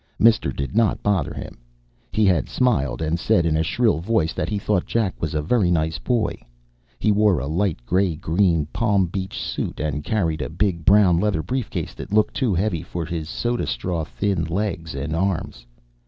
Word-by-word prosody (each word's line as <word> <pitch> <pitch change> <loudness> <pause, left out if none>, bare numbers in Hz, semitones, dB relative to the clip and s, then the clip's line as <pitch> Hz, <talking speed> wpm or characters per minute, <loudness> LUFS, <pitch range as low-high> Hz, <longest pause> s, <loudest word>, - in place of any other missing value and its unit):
Mister 110 -11 +4
did 70 +7 -5
not 115 -1 +2
bother 100 -4 +1
him. - - -8 0.5
He 110 - +2
had 90 -8 +2
smiled 80 - +1
and 80 +2 0
said 85 0 +2
in 80 -2 +2
a 80 - +2
shrill 110 +1 +1
voice 85 -3 0
that - - -2
he 105 - -1
thought 100 -2 0
Jack 110 -5 0
was 80 -1 -2
a 75 - 0
very 95 +2 +2
nice 80 -2 0
boy. 120 -4 -1 0.6
He 105 - +2
wore 105 -2 +3
a 65 - -3
light 80 -4 -1
grey 90 +2 +1
green 85 0 +1
Palm 105 -5 +2
Beach 95 +2 -4
suit - - -4
and 75 -1 -2
carried 80 -6 0
a - - -3
big 85 -1 -1
brown 95 -4 +5
leather 95 -5 0
briefcase 125 - -3
that - - -9
looked 110 0 +3
too 120 -8 0
heavy 90 -2 0
for 85 -1 -5
his 80 -1 -4
soda 120 +4 -1
straw 85 -3 -2
thin 95 +2 -1
legs 85 -3 -3
and 70 +4 -3
arms. 85 -9 -2
90 Hz, 190 wpm, -22 LUFS, 80-105 Hz, 0.6 s, brown